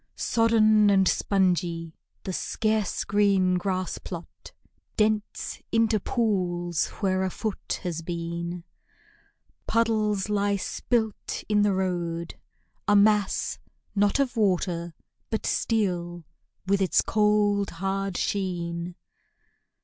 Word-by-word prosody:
Sodden 215 Hz, -2 st, +4 dB
and 195 Hz, -2 st, +4 dB
spongy, 175 Hz, -5 st, +1 dB, 0.3 s
the 190 Hz, -, -4 dB
scarce 215 Hz, +1 st, -1 dB
green 195 Hz, -3 st, +2 dB
grass 185 Hz, -1 st, -2 dB
plot 170 Hz, -2 st, -9 dB, 0.5 s
Dents 215 Hz, -1 st, 0 dB
into 225 Hz, -1 st, +3 dB
pools 180 Hz, -7 st, 0 dB
where 190 Hz, -2 st, +1 dB
a 190 Hz, -, 0 dB
foot 215 Hz, +2 st, -4 dB
has 170 Hz, -3 st, -3 dB
been. 170 Hz, +1 st, -4 dB, 1.0 s
Puddles 215 Hz, -3 st, +1 dB
lie 205 Hz, -1 st, +1 dB
spilt 220 Hz, +2 st, -2 dB
in 210 Hz, -1 st, +3 dB
the 205 Hz, -2 st, +3 dB
road 170 Hz, -3 st, -2 dB, 0.5 s
a 205 Hz, -, +5 dB
mass, 205 Hz, 0 st, +3 dB, 0.3 s
not 205 Hz, +2 st, +2 dB
Of 270 Hz, -3 st, 0 dB
water, 180 Hz, -5 st, 0 dB, 0.3 s
but 220 Hz, -, -2 dB
steel, 175 Hz, -6 st, -1 dB, 0.4 s
with 200 Hz, +1 st, +2 dB
its 190 Hz, -, +3 dB
cold, 210 Hz, -2 st, +2 dB
hard 195 Hz, +1 st, -2 dB
sheen. 175 Hz, -3 st, -2 dB
195 Hz, 105 wpm, -26 LUFS, 175-210 Hz, 1.0 s, a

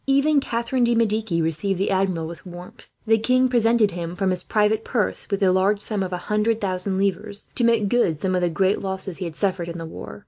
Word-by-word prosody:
Even 280 Hz, +2 st, +3 dB
Catharine 240 Hz, -1 st, -1 dB
de 235 Hz, 0 st, +3 dB
Medici 215 Hz, -6 st, +1 dB
received 175 Hz, +4 st, -1 dB
the 195 Hz, -, 0 dB
Admiral 185 Hz, -4 st, 0 dB
with 170 Hz, +1 st, -9 dB
warmth. 175 Hz, -1 st, -12 dB
The 225 Hz, 0 st, +3 dB
king 255 Hz, +3 st, +3 dB
presented 230 Hz, -3 st, +3 dB
him, 170 Hz, 0 st, -5 dB
from 190 Hz, 0 st, 0 dB
his 180 Hz, -1 st, -1 dB
private 215 Hz, +2 st, +1 dB
purse, 230 Hz, -5 st, -2 dB
with 200 Hz, -1 st, -1 dB
the 190 Hz, -2 st, +4 dB
large 195 Hz, +3 st, +2 dB
sum 210 Hz, -1 st, -2 dB
of 185 Hz, -1 st, -3 dB
a 180 Hz, -, -2 dB
hundred 215 Hz, +1 st, +1 dB
thousand 190 Hz, -1 st, -2 dB
livres; 200 Hz, +2 st, -2 dB
to 245 Hz, -, +1 dB
make 230 Hz, -3 st, +3 dB
good 195 Hz, -8 st, +1 dB
some 185 Hz, +5 st, -2 dB
of 180 Hz, -, +1 dB
the 175 Hz, -, +1 dB
great 190 Hz, +5 st, +1 dB
losses 190 Hz, -2 st, -1 dB
he 185 Hz, -, -4 dB
had 165 Hz, -2 st, -6 dB
suffered 185 Hz, -3 st, -1 dB
in 170 Hz, -, -6 dB
the 165 Hz, -, -6 dB
war. 160 Hz, -, -9 dB
200 Hz, 235 wpm, -23 LUFS, 180-225 Hz, -, the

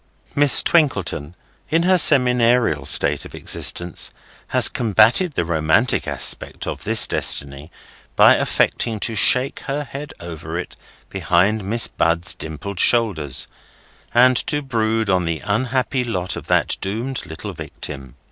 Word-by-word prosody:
Miss 145 Hz, -3 st, +5 dB
Twinkleton, 95 Hz, -, 0 dB, 0.3 s
in 165 Hz, +2 st, +1 dB
her 185 Hz, +1 st, +2 dB
seminarial 125 Hz, -, +3 dB
state -, -, +2 dB
of -, -, -12 dB
existence, 85 Hz, -1 st, -1 dB, 0.4 s
has -, -, +5 dB
combated 115 Hz, -, +2 dB
the 85 Hz, -, -2 dB
romantic 80 Hz, +8 st, 0 dB
aspect -, -, 0 dB
of -, -, -7 dB
this -, -, +4 dB
destiny 70 Hz, +2 st, 0 dB, 0.5 s
by -, -, +6 dB
affecting 110 Hz, -3 st, -1 dB
to 115 Hz, -, 0 dB
shake 125 Hz, +5 st, +2 dB
her 145 Hz, +1 st, -3 dB
head 145 Hz, +1 st, -9 dB
over 80 Hz, -1 st, -8 dB
it 90 Hz, -, -7 dB, 0.4 s
behind 95 Hz, +3 st, 0 dB
Miss 110 Hz, +4 st, +1 dB
Bud's 85 Hz, +2 st, 0 dB
dimpled 80 Hz, +5 st, -8 dB
shoulders, 95 Hz, -, 0 dB, 0.6 s
and 125 Hz, +1 st, +4 dB
to 145 Hz, 0 st, -1 dB
brood 115 Hz, -4 st, -2 dB
on 90 Hz, -2 st, 0 dB
the 80 Hz, -1 st, -4 dB
unhappy 125 Hz, +4 st, -1 dB
lot 95 Hz, -7 st, -3 dB
of -, -, -9 dB
that -, -, 0 dB
doomed 115 Hz, +7 st, -4 dB
little 80 Hz, -1 st, -8 dB
victim. 70 Hz, -3 st, -8 dB
110 Hz, 135 wpm, -19 LUFS, 85-125 Hz, 0.6 s, by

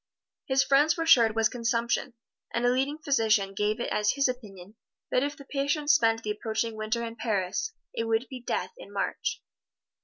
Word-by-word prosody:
His 270 Hz, 0 st, +3 dB
friends 280 Hz, +4 st, +3 dB
were 330 Hz, -, -1 dB
sure 245 Hz, -8 st, +7 dB
it 220 Hz, -, -6 dB
was 225 Hz, -1 st, +4 dB
consumption, 235 Hz, +1 st, -1 dB, 0.4 s
and 235 Hz, +1 st, 0 dB
a -, -, +5 dB
leading 270 Hz, +4 st, 0 dB
physician 220 Hz, -9 st, +1 dB
gave 210 Hz, +3 st, 0 dB
it 240 Hz, -, -3 dB
as 210 Hz, 0 st, +2 dB
his 280 Hz, 0 st, +2 dB
opinion 205 Hz, -6 st, -7 dB, 0.4 s
that 250 Hz, -, +3 dB
if 290 Hz, +2 st, -2 dB
the 280 Hz, -, -12 dB
patient 290 Hz, +2 st, +1 dB
spent 225 Hz, -5 st, +3 dB
the 210 Hz, -, -1 dB
approaching 220 Hz, +1 st, -2 dB
Winter 215 Hz, +2 st, -2 dB
in 230 Hz, 0 st, -7 dB
Paris, 210 Hz, -, -1 dB, 0.2 s
it 230 Hz, -, -2 dB
would 225 Hz, +2 st, +1 dB
be 255 Hz, +1 st, -8 dB
death 240 Hz, -, -2 dB
in -, -, -11 dB
March. -, -, -2 dB
235 Hz, 190 wpm, -28 LUFS, 220-275 Hz, 0.4 s, sure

